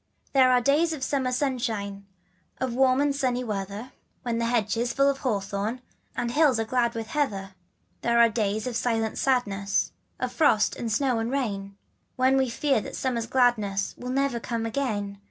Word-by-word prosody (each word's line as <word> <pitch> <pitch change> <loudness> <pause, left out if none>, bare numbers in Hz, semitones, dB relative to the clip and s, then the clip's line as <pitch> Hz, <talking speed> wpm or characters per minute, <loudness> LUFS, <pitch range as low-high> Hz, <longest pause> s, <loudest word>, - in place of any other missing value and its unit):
s^j 270 - +5
^HERE 255 - +6
are 250 -1 +4
days 300 +6 +3
of 285 -4 -5
summer 265 -2 0
sunshine, 225 -7 -2 0.5
jf - - +1
Of 240 - -4
warm 260 +1 +3
and 285 -1 +1
sunny 255 -3 0
weather, 205 +2 -5 0.3
When 235 -1 -1
the 235 - 0
hedge 230 -3 +1
is 235 +1 -1
full 275 0 +3
of 275 -1 +1
hawthorn 205 0 -2 0.4
And 235 - -1
hills 290 -4 +3
are 225 - 0
glad 235 0 0
with 225 -1 -3
heather. 200 -10 -1 0.5
There 235 0 +2
are 235 0 +7
days 215 -1 -1
of 250 -2 -3
silent 225 -2 0
sadness, 200 -7 +1 0.3
Of - - -2
frost, 225 -10 +3
and 230 -2 -4
snow, 250 +1 +1
and 225 +1 -2
rain, 200 -7 -3 0.4
When 260 +1 +3
we 265 -1 +2
fear 270 0 +1
that - - -7
summer's 235 -3 -2
gladness 215 -6 +1
Will 250 - -7
never 270 -2 0
come 230 -1 -3
again. 215 -5 -2
240 Hz, 190 wpm, -26 LUFS, 215-260 Hz, 0.5 s, are